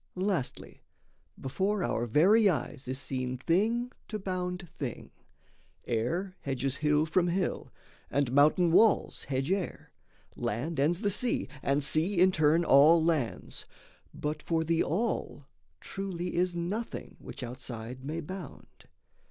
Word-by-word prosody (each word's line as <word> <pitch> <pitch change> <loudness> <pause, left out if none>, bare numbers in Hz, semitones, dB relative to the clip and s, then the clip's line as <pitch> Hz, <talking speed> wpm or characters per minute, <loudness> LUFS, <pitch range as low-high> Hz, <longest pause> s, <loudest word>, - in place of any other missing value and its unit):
Lastly, 185 -7 -3 0.6
before 190 +9 -1
our 120 +1 -1
very 195 - +5
eyes 145 -3 -3
is 130 +1 -3
seen 130 -2 -3
Thing 220 - +1 0.2
to 215 - -4
bound 180 -2 -4
thing: 130 -5 -5 0.7
air 170 - -1
hedges 135 0 -2
hill 150 0 +2
from 175 +3 +2
hill, 180 +1 -1 0.4
And 140 -3 0
mountain 155 +5 +4
walls 215 +5 +3
hedge 135 +4 -1
air; 195 -2 -3 0.4
land 135 +9 -3
ends 165 +7 +2
the 205 - +1
sea, 240 +5 0
And 140 +1 +1
sea 165 +6 +2
in 185 +1 +6
turn 160 0 +3
all 160 +4 +6
lands; 155 -9 -1 0.5
but 150 +1 -4
for 165 -1 0
the 165 +1 +1
All 180 - -2 0.3
Truly 180 -3 -4
is 175 0 +1
nothing 195 +7 -4
which 140 - -8
outside 125 0 -7
may 155 +4 -3
bound. 180 -1 -10
165 Hz, 130 wpm, -30 LUFS, 140-185 Hz, 0.7 s, in